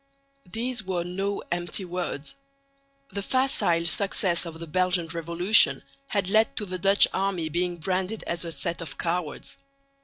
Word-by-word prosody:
These 235 +1 -1
were 185 -2 -2
no 195 +3 -3
empty 175 +2 -1
words. 175 -5 -4 0.8
The 200 - -3
facile 200 -9 +1
success 180 -1 +2
of 165 -1 -9
the 165 - -6
Belgian 180 +1 +1
revolution 170 +5 +4 0.2
had 200 -6 0
led 220 +3 +3
to 210 - +1
the 185 -1 -5
Dutch 195 +3 +6
army 190 -4 -1
being 175 +2 -1
branded 190 +5 -2
as 170 0 -3
a 170 - -5
set 170 +1 -3
of 165 - -7
cowards. 170 -2 -3
180 Hz, 150 wpm, -26 LUFS, 170-200 Hz, 0.8 s, Dutch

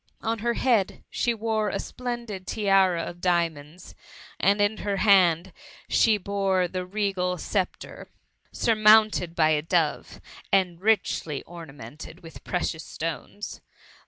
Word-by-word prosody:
On 225 0 -1
her 235 +2 -1
head, 230 -7 +1
she 240 - 0
wore 220 -2 -1
a - - -2
splendid 235 -6 -6
tiara 195 -5 +2
of 175 0 -8
diamonds; 170 -2 -2 0.5
and 200 +1 +3
in 205 +1 +2
her 200 -1 -2
hand, 185 -3 +4 0.4
she 220 -2 +4
bore 195 -2 0
the 180 0 -5
regal 190 -2 -1
sceptre, 185 +2 -4 0.4
surmounted 215 -5 +4
by 155 -1 +3
a 150 -1 +2
dove, 160 - -1 0.3
and 180 -3 +1
richly 195 -8 0
ornamented 155 0 -11
witb 165 - -12
precious 175 -3 -2
stones. 165 +5 -6
190 Hz, 125 wpm, -25 LUFS, 170-215 Hz, 0.5 s, hand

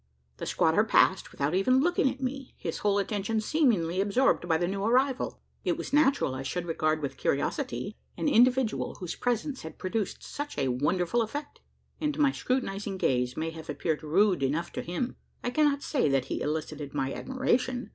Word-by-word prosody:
The - - -5
squatter - - +3
passed, - - +3
without 140 +3 -1
even 225 +8 +4
looking 325 -2 +3
at 265 +1 -6
me 270 +1 -4
his 165 - -4
whole 205 -1 +2
attention 205 +2 -1
seemingly 215 - +2
absorbed 205 -2 +2
by 165 -2 +3
the 175 +1 0
new 195 +1 -2
arrival! 255 +4 +1 0.2
It - - 0
was - - -6
natural 280 - +3
I 130 - -4
should 175 +6 -3
regard 155 -2 0
with 140 - -3
curiosity 210 - -1 0.2
an - - -1
individual, 250 -3 +3
whose 180 -3 -5
presence 245 +3 -1
had 160 -1 -9
produced 200 +1 -3
such 290 0 -6
a 135 - +1
wonderful 175 - +1
effect; 290 +7 -5 0.4
and 300 -2 -1
my 285 -2 +4
scrutinising 205 -8 -2
gaze 125 -6 0
may 160 +1 -2
have 160 0 -10
appeared 160 -3 -1
rude 180 +3 +3
enough 150 +6 0
to - - -4
him. 180 +9 -3 0.3
I 245 - -1
cannot 285 0 +2
say 260 - +1
that 135 -2 +2
he - - -3
elicited 150 -1 -3
my 135 -1 -1
admiration. 255 -1 -1
200 Hz, 180 wpm, -28 LUFS, 160-260 Hz, 0.4 s, even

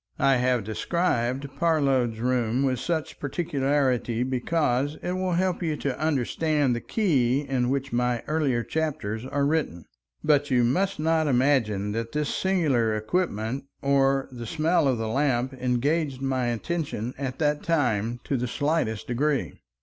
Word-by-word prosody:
I 135 -1 +4
have 125 -2 +1
described 130 - -1
Parload's 135 -8 +2
room 125 +1 +1
with 130 -3 +1
such 160 0 -3
particularity 135 -6 0
because 130 +2 0
it 180 - -2
will 185 0 -1
help 185 +1 0
you 160 -3 -1
to 135 -3 -3
understand 150 -1 +1
the 120 - -4
key 140 - +1
in 130 -4 -1
which 135 -1 -2
my 125 -1 0
earlier 145 -6 0
chapters 135 -8 -3
are 140 +1 0
written, 140 - -1 0.4
but 145 -1 +3
you 125 -2 +3
must 185 +12 +1
not 160 0 +1
imagine 120 -7 +2
that 115 +2 -4
this 150 -1 -1
singular 145 - +1
equipment 115 - -2 0.2
or 135 -1 +2
the 120 -2 -7
smell 160 +2 +2
of 130 -3 +2
the 110 0 -2
lamp 130 +1 0
engaged 130 +3 0
my 130 -2 0
attention 125 -1 -3
at 135 -2 -3
that 150 -1 +1
time 120 -8 0
to 135 - -1
the 125 +1 -2
slightest 145 -5 -1
degree. 140 +3 0
135 Hz, 150 wpm, -26 LUFS, 120-155 Hz, 0.4 s, I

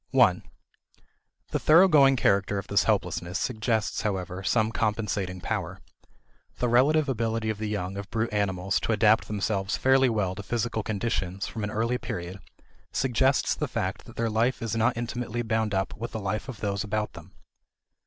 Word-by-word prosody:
1. - - +4 1.1
The - - 0
thoroughgoing 155 -5 +6
character 100 -4 +2
of 100 - -4
this 100 - +2
helplessness 95 -4 0
suggests, 110 -1 -1
however, 95 -3 -3
some 110 +3 +1
compensating 105 -4 -1
power. - - -3 0.8
The 125 - 0
relative 140 +6 +4
ability 115 -3 -1
of 105 - -7
the 110 -1 -3
young 100 -2 -3
of 100 -1 -6
brute 115 0 -2
animals 95 -2 0
to 115 - 0
adapt 110 +1 +4
themselves 100 -1 -1
fairly 130 0 +4
well 105 -5 0
to 100 - -7
physical 115 +2 -2
conditions 100 -3 -2
from 110 - -5
an 105 - -2
early 115 +4 -1
period 90 +2 -5 0.5
suggests 130 +1 +2
the - - -2
fact - - -3
that - - -13
their 115 -1 -1
life 115 +4 +1
is 115 -1 -2
not 115 +2 +1
intimately 120 0 -3
bound 110 -1 0
up 95 0 -1
with 115 +2 -6
the 110 - -3
life 105 +5 -3
of 115 -6 -8
those 100 -2 -1
about 105 0 -2
them. 85 +2 -13
110 Hz, 170 wpm, -27 LUFS, 100-120 Hz, 1.1 s, thoroughgoing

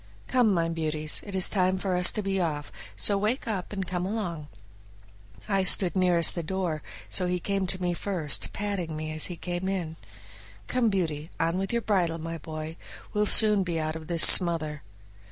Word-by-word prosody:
"Come, 245 -4 +2
my 170 -3 0
beauties, 155 -2 0
it 200 - -6
is 185 - +4
time 185 -1 0
for 185 -1 -2
us 180 -1 +6
to 215 - -4
be 195 -1 -2
off, 150 -4 -3 0.2
so 200 - +1
wake 220 +6 -2
up 195 -5 -4
and 195 -2 -4
come 180 0 -4
along." 180 -7 -4 1.0
I 195 -1 0
stood 185 0 0
nearest 180 -3 +2
the 170 - -4
door, 170 -2 -4 0.3
so 180 -2 +1
he 180 0 -2
came 195 +1 -2
to 185 +1 -1
me 180 -1 -2
first, 170 -6 -3
patting 190 -6 -4
me 155 0 -5
as 155 0 +3
he 175 - -7
came 175 +2 -5
in. 170 -5 -4 0.7
"Come, 250 -3 0
Beauty, 165 -6 -3
on 165 +3 -1
with 195 0 -4
your 235 -1 -2
bridle, 175 -6 0
my 165 0 -7
boy, 155 +1 -8 0.4
we'll 210 0 0
soon 210 -2 +5
be 170 -3 -3
out 155 0 -3
of 160 -1 -9
this 170 -2 +6
smother." 160 -4 +7
180 Hz, 190 wpm, -26 LUFS, 160-195 Hz, 1.0 s, smother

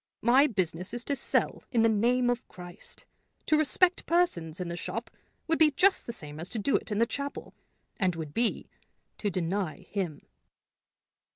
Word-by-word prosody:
My 260 +5 +6
business 185 - -2
is 240 - -4
to 285 - 0
sell 265 - 0
in 235 -3 +3
the - - +6
name 245 +3 +3
of 245 0 -3
Christ. 175 -1 -9 0.4
To 310 - +4
respect 330 +5 +3
persons 185 - +1
in 180 - -3
the 170 - -4
shop 175 - -5 0.4
would 325 0 +1
be 315 -1 +7
just 375 +7 +3
the - - -2
same 150 -9 -9
as 170 - -5
to - - -4
do 220 +6 +1
it - - -1
in 205 - 0
the 230 - +4
chapel, 280 +3 -5 0.5
and 185 -4 +2
would 155 -3 -6
be 235 0 0 0.5
to 205 - 0
deny 180 -1 -2
him." 180 -8 -3
225 Hz, 180 wpm, -29 LUFS, 175-270 Hz, 0.5 s, be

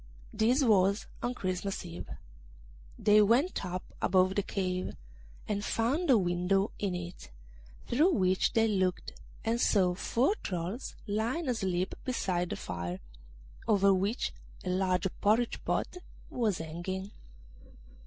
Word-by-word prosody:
This 245 +6 +3
was 200 -3 +3 0.2
on 245 +1 -2
Christmas 185 -2 -3
Eve. 170 0 -7 0.9
They 210 0 +5
went 240 - +3
up 180 +1 -4 0.2
above 185 0 +3
the 205 - +1
cave, 185 -2 -2 0.5
and 205 -1 -1
found 270 - 0
a 255 - +7
window 185 +2 +1
in 195 -3 -1
it, 175 0 -7 0.6
through 305 +10 +3
which 185 - +2
they 225 -1 +4
looked, 185 -4 0 0.3
and 230 +2 +1
saw 185 -4 +3
four 240 - +1
trolls 180 +6 -4
lying 235 +9 -1
asleep 190 -6 0
beside 180 -8 -1
the - - -2
fire, 90 +1 -5 0.7
over 200 -2 +5
which 200 +6 0 0.3
a 185 - -3
large 185 -1 +1 0.2
porridge 225 +3 +2
pot - - -1 0.3
was 220 -7 0
hanging. 175 +5 -5
195 Hz, 125 wpm, -31 LUFS, 180-225 Hz, 0.9 s, a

